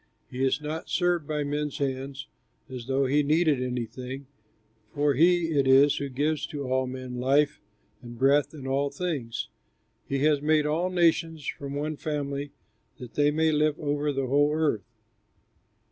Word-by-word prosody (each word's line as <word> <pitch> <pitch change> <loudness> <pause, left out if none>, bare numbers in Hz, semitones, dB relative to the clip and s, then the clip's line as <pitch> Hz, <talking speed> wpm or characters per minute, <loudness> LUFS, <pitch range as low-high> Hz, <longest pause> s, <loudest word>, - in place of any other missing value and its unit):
He 130 +1 -2
is 135 +1 +2
not 155 +2 -5
served 175 -4 +1
by 150 -1 -1
men's 145 0 -2
hands, 135 -1 -3 0.4
as 130 -3 -8
though 135 +1 +1
he 145 +3 +3
needed 150 -1 +2
anything, 125 +2 -4 0.7
for 145 0 +2
he 170 +4 +3
it 140 -3 +2
is 140 +2 +6
who 140 - -3
gives 145 +3 -1
to 145 -2 -5
all 130 0 +1
men 130 -1 -6
life 140 +3 +2 0.4
and 120 -2 -10
breath 140 +2 +3
and 140 -4 -8
all 140 +1 +1
things. 140 -7 -4 0.6
He 140 - -1
has 150 -2 +3
made 155 0 +3
all 165 +5 0
nations 165 -3 +1
from 140 0 -5
one 150 +1 -3
family 140 -2 -3 0.5
that 125 -1 -10
they 145 0 +3
may 160 +1 +2
live 150 0 +1
over 145 0 -1
the 135 -1 -1
whole 145 +3 +3
earth. 145 - 0
145 Hz, 160 wpm, -27 LUFS, 135-150 Hz, 0.7 s, is